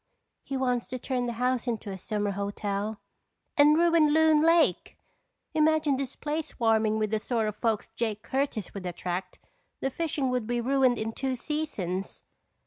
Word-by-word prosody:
He 275 - -4
wants 250 -2 0
to 255 - -4
turn 250 -1 -2
the 240 - -2
house 250 +1 0
into 220 -3 -3
a 190 - -5
summer 205 0 -1
hotel." 200 +1 -3 0.6
"And 300 +1 +6
ruin 335 -3 +4
Loon 315 0 +5
Lake. 330 +1 +3 0.6
Imagine 310 -2 +3
this 270 -1 -4
place 305 +1 -3
swarming 220 -4 +1
with 215 -1 -1
the 220 - +1
sort 225 0 -1
of 210 - -3
folks 225 -1 0
Jake 215 -2 -2
Curtis 265 -7 -2
would 190 -2 -5
attract. 180 +1 -4 0.4
The 270 - -1
fishing 290 -4 -1
would 250 -3 -1
be 240 0 0
ruined 255 0 +3
in 220 +1 -2
two 265 +2 -2
seasons!" 235 - -3
245 Hz, 165 wpm, -28 LUFS, 215-290 Hz, 0.6 s, And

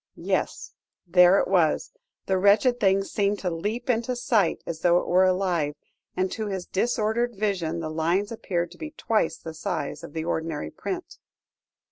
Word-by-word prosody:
Yes - - -2 0.3
there 180 +2 +6
it - - +1
was. 175 -5 +2 0.3
The 190 -1 +1
wretched 210 +6 +4
thing 195 -2 +3
seemed 205 +1 0
to 180 -3 -2
leap 210 +9 -3
into 245 0 0
sight 225 -6 +1
as 165 -2 -5
though 175 +1 +4
it - - 0
were 185 +2 +4
alive, 180 -6 +1 0.4
and 185 0 0
to 220 -1 -3
his 190 -3 -4
disordered 235 +2 0
vision 180 -5 -1
the 155 -1 -4
lines 170 +6 0
appeared 175 -6 -2
to 175 - -15
be 310 - -5
twice 215 -8 0
the 160 - -8
size 155 0 -4
of 170 - -9
the 160 -1 -3
ordinary 160 - -3
print. - - -6
185 Hz, 170 wpm, -25 LUFS, 170-210 Hz, 0.4 s, there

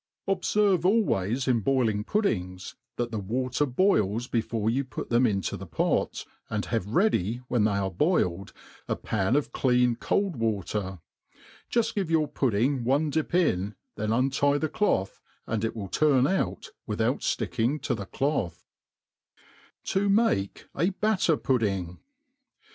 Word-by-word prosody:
Qbferire 195 -1 +2
always 135 - +1
in 125 -3 +3
boiling 110 -3 +1
pud 210 - 0
dings, 90 - -3 0.2
that 120 -1 -2
the 110 - -2
water 125 +7 -1
boils 120 - +2
before 115 -2 -1
you 130 +5 +1
put 130 -2 -7
them 120 +1 +4
into 100 -4 -1
the - - -8
pot^ - - -1 0.2
and 105 -4 -2
have 115 -1 -2
ready^ 120 - +1
when 120 -4 +2
they 105 - +2
are 95 -1 -1
boiled, 100 - 0 0.4
a - - 0
pan 105 +3 0
of 145 - 0
clean 125 -2 +2
cold 190 - -1
wa 110 -4 0
ter; 95 -1 -4 0.7
jgft 235 -2 +1
give 195 -5 -2
your 160 -2 +2
pudding 130 -1 0
one 145 +5 +1
dip 160 +3 -1
in, 105 - +1 0.2
then 110 0 -2
untie 135 +4 +2
tbe 155 +1 -1
tloth^ 95 - 0 0.3
and 110 -1 -2
it 115 - -1
will 105 -3 -5
turii 135 - +3
out, - - -3 0.2
without - - 0
flicking 125 +7 0
to - - -1
the 100 -4 -5
cloth* 115 - -2 1.2
To 200 +1 0
make 200 - +1
a 165 +5 +1
BaitifPuik^. 130 - 0
125 Hz, 150 wpm, -27 LUFS, 105-155 Hz, 1.2 s, them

